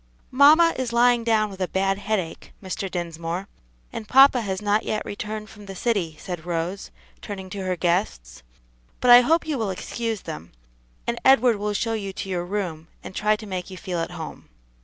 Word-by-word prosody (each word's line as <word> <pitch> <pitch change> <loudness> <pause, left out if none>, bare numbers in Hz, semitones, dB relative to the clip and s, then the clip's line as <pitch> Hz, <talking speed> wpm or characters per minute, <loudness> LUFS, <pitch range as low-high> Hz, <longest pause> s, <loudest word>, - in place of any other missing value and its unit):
"Mamma 305 +5 +6
is 255 -2 -2
lying 240 0 +4
down 215 -2 +2
with 190 -1 -9
a 185 - +1
bad 195 +1 0
headache, 200 -5 -3
Mr. 190 0 -4
Dinsmore, 170 +1 -4 0.5
and 215 - -6
papa 270 0 +6
has 190 -3 -3
not 210 +1 +1
yet 215 - -2
returned 215 +1 -5
from 210 -2 -13
the 195 - -7
city," 185 -8 -1
said 175 -3 -6
Rose, 175 +3 -3 0.3
turning 190 -2 -7
to 200 - -5
her 185 -1 -1
guests; 170 - -1 0.6
"but 250 - +4
I 245 0 +11
hope 325 +7 +2
you 300 -5 -2
will 220 -3 -1
excuse 225 +3 -3
them, 80 +3 -8 0.5
and 235 0 -2
Edward 250 -4 +5
will 210 +1 -2
show 225 +2 -1
you 200 -3 -4
to 195 - -6
your 175 -2 -2
room, 175 -5 -4 0.2
and - - -8
try 210 +2 +2
to 215 +1 -9
make 185 -2 -5
you 185 - -9
feel 180 0 -4
at 165 - -2
home." - - -8
200 Hz, 195 wpm, -24 LUFS, 180-230 Hz, 0.6 s, I